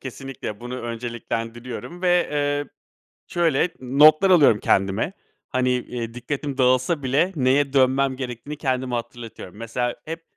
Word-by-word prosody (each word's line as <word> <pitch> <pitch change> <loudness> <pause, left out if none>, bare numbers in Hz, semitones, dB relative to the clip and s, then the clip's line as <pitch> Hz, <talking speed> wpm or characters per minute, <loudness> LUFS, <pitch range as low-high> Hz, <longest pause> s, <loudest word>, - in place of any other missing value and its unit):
kesinlikle. 130 -5 -7
Bunu 125 +1 -6
önceliklendiriyorum 120 +5 -5
ve, 180 -1 +3
eee, 145 0 0 0.6
şöyle, 170 -1 +1
notlar 150 +8 +5
alıyorum 145 - +6
kendime; 100 - +1 0.4
hani, 130 0 +1
eee, 120 -2 -3
dikkatim 135 +3 -4
dağılsa 130 +4 +2
bile 140 +8 +2
neye 135 0 +2
dönmem 135 0 +3
gerektiğini 130 +3 -6
kendime 130 -3 -1
hatırlatıyorum. 115 -5 -7
Mesela 115 +2 -3
hep, 165 +1 -6
130 Hz, 120 wpm, -23 LUFS, 120-145 Hz, 0.6 s, alıyorum